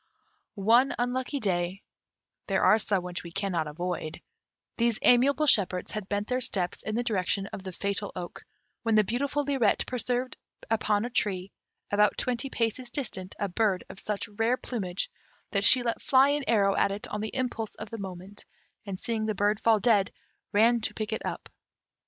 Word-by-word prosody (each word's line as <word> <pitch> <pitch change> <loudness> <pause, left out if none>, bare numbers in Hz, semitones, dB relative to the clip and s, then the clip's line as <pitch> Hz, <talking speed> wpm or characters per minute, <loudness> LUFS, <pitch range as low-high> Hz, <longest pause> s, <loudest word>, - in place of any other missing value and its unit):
One 230 +7 +4
unlucky 255 +3 -1
day 185 -2 -1 0.6
(there - - +1
are 215 - +6
some 200 -4 0
which 180 -1 -4
we 170 - -10
cannot 175 -4 -1
avoid), 160 0 -4 0.6
these 235 -1 +2
amiable 275 +5 +5
shepherds 190 -9 +2
had 210 -3 -5
bent 205 0 -1
their 255 0 0
steps 180 -7 -1
in 215 - -3
the 240 - 0
direction 195 -3 0
of 190 - -6
the 190 - -5
fatal 200 +2 -2
oak, 175 -1 -7 0.4
when 225 -1 +1
the 215 - +6
beautiful 280 +7 -1
Lirette 270 -7 +2
perceived 250 0 -2 0.3
upon 215 -1 +1
a 245 - -5
tree, 195 -4 -1 0.4
about 210 0 +3
twenty 250 +2 -1
paces 240 +1 -2
distant, 205 -8 -3
a 200 - -1
bird 195 0 +1
of 190 - -9
such 210 0 -3
rare 225 +4 0
plumage, 195 -9 -3 0.4
that 200 - +1
she 250 +4 +7
let 235 -1 -2
fly 270 -1 +5
an 290 -1 0
arrow 200 -3 +3
at - - +3
it 200 +1 -4
on 210 - -3
the 215 - -4
impulse 240 -4 -2
of 215 - -8
the 230 - -5
moment, 190 +1 -8 0.4
and 190 -2 -4
seeing 220 -2 -1
the 215 - -1
bird 205 +1 +1
fall 225 -2 +4
dead, 205 -2 +3 0.4
ran 230 +3 +4
to - - -2
pick 220 0 -3
it - - -3
up. - - -5
215 Hz, 180 wpm, -28 LUFS, 195-240 Hz, 0.6 s, she